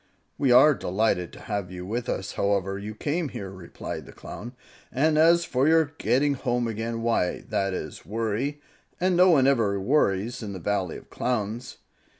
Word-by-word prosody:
"We 135 -3 +3
are 130 +5 +8
delighted 95 -5 0
to - - -11
have 100 -4 -3
you 90 0 -7
with 115 +5 -3
us, 95 - -2
however 100 -1 0
you 105 +1 -6
came 155 +6 -2
here," 95 -5 -6
replied 95 -3 -7
the - - -10
Clown; 120 +1 -9 0.4
"and 155 +4 +2
as 170 +2 +5
for 130 -1 +1
your 160 -2 +3
getting 140 +3 +2
home 125 -3 -1
again, 115 +1 -3
why, 115 -6 +1
that 95 -1 0
is - - -6
worry, 115 +7 -2 0.4
and 185 +1 +2
no 180 +1 +6
one 140 -7 +5
ever 115 -7 +2
worries 115 0 +1
in 105 -3 -5
the 95 - -6
Valley 95 -1 -1
of - - -16
Clowns. 120 0 -3
115 Hz, 175 wpm, -26 LUFS, 100-140 Hz, 0.4 s, are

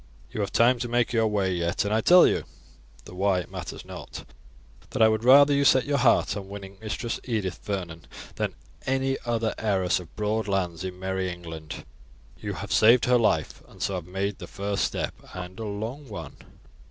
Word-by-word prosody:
You 110 - -3
have 100 -2 -2
time 120 +4 +4
to 120 - -2
make 120 0 +1
your 115 -1 +3
way 100 -3 0
yet, 85 +2 -1
and 100 - 0
I 110 - +2
tell 180 +8 +7
you, - - +1 0.6
though - - -11
why 95 0 +1
it 90 - -7
matters - - -7
not, - - -9 0.6
that - - -4
I 110 - +7
would 110 0 +1
rather 140 +3 +7
you 140 0 +3
set 130 -2 +5
your 145 0 +1
heart - - +3
on 100 -2 -6
winning 100 -1 -9
Mistress 110 +2 -3
Edith 105 -7 -2
Vernon 85 -6 -5 0.3
than - - -3 0.3
any 135 0 0
other 115 -1 0
heiress 95 -5 +1
of 85 -3 -13
broad 105 0 -1
lands 95 -3 -1
in 90 -1 -5
merry 95 0 -2
England. 80 -3 -8 0.5
You - - -4
have - - -7
saved 115 +3 +6
her 125 0 +4
life, 80 -9 +1
and - - -17
so 100 - -1
have 90 -3 -4
made 95 +2 -3
the - - -8
first 100 0 -1
step - - -2 0.2
and 90 +1 -7
a 110 - -4
long 115 +7 -5
one. 85 -8 -7
100 Hz, 200 wpm, -26 LUFS, 95-115 Hz, 0.6 s, tell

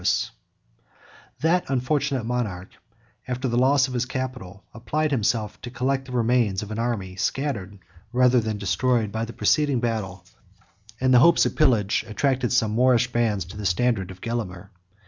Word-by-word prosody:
—M] - - -11 1.4
That 170 +3 +2
unfortunate 135 -1 0
monarch, 110 -7 -3 0.6
after 125 +1 -2
the 120 - -1
loss 130 +2 +4
of 130 - -7
his 125 0 -1
capital, 125 -8 -6
applied 145 +7 -2
himself 110 -4 -1
to 120 - -7
collect 130 +2 -1
the 130 - -11
remains 115 -5 +1
of 105 - -9
an 110 - -4
army 110 -6 -2
scattered, 105 -3 -2 0.3
rather 125 0 +4
than 110 -2 -2
destroyed, 105 +3 0
by 110 +2 -2
the 115 - -9
preceding 145 -2 +2
battle; 100 -6 -3 0.7
and 130 0 +3
the 125 - +7
hopes 170 +6 +5
of - - -2
pillage 115 -10 +2
attracted 125 +2 0
some 110 -3 +2
Moorish 125 +1 +3
bands 110 -6 0
to 90 +3 -11
the 105 - -6
standard 95 0 0
of 95 -1 -11
Gelimer. 100 -5 -5
120 Hz, 165 wpm, -24 LUFS, 105-130 Hz, 1.4 s, the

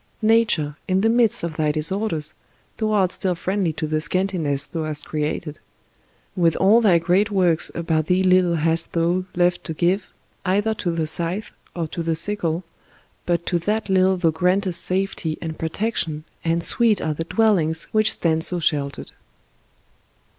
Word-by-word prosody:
Nature, 215 -10 +2
in 185 0 +1
the 225 - +3
midst 230 -5 +2
of 165 -2 -4
thy 155 -1 +1
disorders, 160 +1 -1 0.4
thou 220 -1 -1
art 195 -4 +2
still 185 -2 -1
friendly 185 0 -1
to 155 0 -4
the 155 0 -1
scantiness 165 -6 0
thou 165 -2 -4
hast 150 -1 -3
created; 150 0 -3 0.8
with 170 -4 +2
all 210 +5 +4
thy 195 -6 +5
great 180 +6 +2
works 180 -5 +2
about 160 -2 -1
thee 185 +1 +2
little 185 -2 +3
hast 165 +1 0
thou 175 +2 +1
left 175 0 +1
to 160 - -5
give, 185 +4 0 0.3
either 205 +4 +1
to 205 -4 -3
the 165 -2 -1
scythe 170 +6 -3 0.2
or 170 -2 -2
to 170 - -5
the 165 -1 -1
sickle, 170 -1 -2 0.6
but 170 -1 0
to 175 - 0
that 210 +4 -2
little 190 0 +3
thou 170 -3 +2
gprantest 180 +2 +1
safety 185 -4 -1
and 160 -2 -6
protection, 160 -3 -2 0.2
and 170 0 0
sweet 230 0 +3
are 155 - -1
the 165 - -4
dwellings 170 -7 +1
which 215 0 +3
stand 160 -1 0
so 180 +1 +3
sheltered 145 -3 -1
175 Hz, 165 wpm, -22 LUFS, 160-195 Hz, 0.8 s, thy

